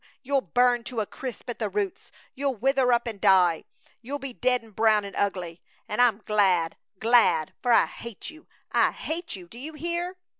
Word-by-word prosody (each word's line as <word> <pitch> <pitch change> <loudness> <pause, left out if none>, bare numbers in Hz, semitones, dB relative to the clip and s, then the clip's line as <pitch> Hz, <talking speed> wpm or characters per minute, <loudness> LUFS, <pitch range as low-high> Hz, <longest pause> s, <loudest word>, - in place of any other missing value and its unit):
You'll 275 +1 +1
burn 245 +5 +2
to 245 -3 -4
a 215 - 0
crisp 255 +3 -8
at - - -9
the 215 -3 -1
roots! 200 -1 -3 0.2
You'll 275 -1 -1
wither 260 +2 +2
up 240 0 +2
an' 220 -4 -4
die. 180 -4 +4 0.4
You'll 270 +5 -4
be 275 -2 -7
dead 250 0 +1
an' 225 - -16
brown 215 -1 +3
an' 200 - -8
ugly! 180 -4 -2 0.3
An' - - -4
I'm 230 -4 +3
glad! 190 -6 +2 0.2
Glad! 220 -9 +3
For 245 - +1
I - - +6
hate 235 +3 -9
you. 315 +1 -17 0.2
I - - +3
hate 330 - -4
you! 180 -2 -11
Do 230 +7 -12
you 305 +5 -7
hear?" 345 +4 -3
235 Hz, 195 wpm, -26 LUFS, 200-265 Hz, 0.4 s, I